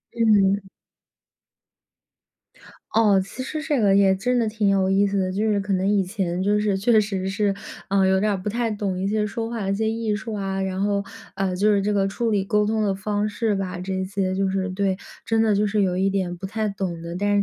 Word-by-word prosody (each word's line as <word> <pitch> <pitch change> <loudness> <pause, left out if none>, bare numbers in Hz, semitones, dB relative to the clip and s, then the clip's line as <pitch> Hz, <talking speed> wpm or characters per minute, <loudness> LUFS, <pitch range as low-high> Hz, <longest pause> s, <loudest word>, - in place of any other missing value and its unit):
嗯。 205 -4 +3 2.3
哦， 210 -3 +4
其 235 - -8
实 310 +4 -4
这 300 -4 0
个 200 -2 +4
也 195 -1 +4
真 245 +6 0
的 230 -2 +1
挺 215 -1 0
有 195 -1 +2
意 195 +1 +3
思 200 0 -1
的。 185 -1 0
就 215 +3 0
是 205 - +1
可 195 0 -2
能 190 +1 +1
以 200 -1 +3
前 185 -2 -2
就 205 +1 +2
是 210 -2 +1
确 200 +5 +1
实 195 -2 -3
是， 200 0 0 0.3
呃， 195 0 +3
有 190 0 +3
点 210 +2 +1
儿 200 - 0
不 190 +3 -4
太 235 +2 -1
懂 205 -3 -2
一 190 - -1
些 210 +1 0
说 225 +2 -4
话 230 -3 -4
的 195 - 0
一 - - +1
些 220 +2 0
艺 225 -1 -1
术 215 +1 -5
啊， 195 -1 -2
然 190 -1 -2
后， 200 0 0 0.3
呃， 190 -1 -1
就 205 +3 +3
是 200 - +2
这 205 +2 0
个 200 -1 +2
处 230 +4 -2
理 205 -3 +1
沟 210 +1 +1
通 220 0 0
的 200 -2 +1
方 205 +1 -1
式 215 0 -1
吧， 185 -2 -4
这 190 +1 -3
些 190 -1 -2
就 195 0 +1
是 190 0 -1
对， 190 0 0 0.3
真 225 -1 +2
的 220 -2 +3
就 205 +1 +2
是 210 0 +1
有 180 -2 +1
一 190 +1 +2
点 185 -3 -1
不 185 - -7
太 215 +2 -2
懂 185 -4 -4
的。 170 +1 -6
但 205 +2 +1
200 Hz, 255 characters per minute, -23 LUFS, 190-210 Hz, 2.3 s, 哦